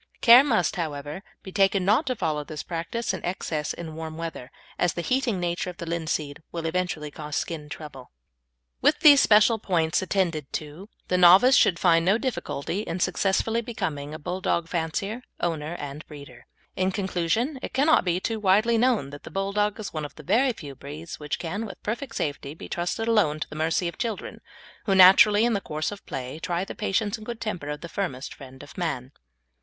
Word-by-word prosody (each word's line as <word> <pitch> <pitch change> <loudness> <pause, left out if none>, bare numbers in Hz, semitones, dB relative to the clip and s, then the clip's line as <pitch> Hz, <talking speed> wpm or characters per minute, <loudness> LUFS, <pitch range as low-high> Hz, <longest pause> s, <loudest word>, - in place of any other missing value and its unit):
Care 245 +2 +9
must, 230 -6 +1
however, 150 0 -4 0.2
be 190 - -8
taken 195 -1 +2
not 220 +10 +3
to 255 - 0
follow 155 -7 -1
this 150 0 -7
practice 175 +7 -3
to 185 -3 -6
excess 155 -4 -2
in 165 -2 -7
warm 160 0 -6
weather, 165 -7 -6 0.3
as 175 -2 +2
the 170 - -4
heating 245 -5 0
nature 175 +1 -2
of 180 - -9
the 170 - -6
linseed 160 -3 -3
will 165 -1 -5
eventually 160 -3 -2
cause 150 +1 -6
skin 155 -3 -3
trouble. 145 -5 -9 0.7
With - - +3
these 290 -3 +8
special 215 +1 +5
points 175 -4 +1
attended 175 -6 -1
to, 155 +7 -6 0.2
the 180 - +2
novice 190 +9 +8
should 175 - +4
find 165 -2 +4
no 195 +5 +3
difficulty 215 - -3
in 185 -4 -4
successfully 195 +5 +1
becoming 150 -11 -4
a 155 - -6
Bulldog 170 +1 -2
fancier, 180 +7 -2 0.2
owner, 165 -1 -2
and 145 -1 -7
breeder. 140 -5 -12 0.3
In 185 0 +1
conclusion, 195 - -1
it - - -5
cannot 290 +4 +4
be 180 -1 0
too 225 +3 -2
widely 215 +4 +3
known 230 - +2
that 145 - -9
the - - -10
Bulldog 200 +4 -1
is 210 - -6
one 155 -1 -3
of 145 - -7
the 155 - -11
very 255 - +3
few 150 - -9
breeds 150 +5 -9
which 150 -1 -3
can, 190 +6 -4
with 210 - -9
perfect 230 +2 -4
safety, 145 0 -3
be - - -9
trusted 175 +6 -2
alone 205 -10 +2
to - - -3
the - - -10
mercy 160 +3 0
of 170 - -7
children, 225 -4 -4 0.5
who, 195 - +3
naturally, 205 +4 +7
in 240 - +2
the 200 - 0
course 155 0 -3
of 205 - -9
play, 130 +3 -5
try 175 +2 -2
the - - -7
patience 210 +1 -1
and 215 - -11
good 235 -2 -5
temper 180 -10 -4
of 150 0 -5
the 170 - -6
firmest 165 -8 -4
friend 130 -1 -12
of 145 - -13
man. 135 -8 -3
175 Hz, 200 wpm, -25 LUFS, 155-210 Hz, 0.7 s, Care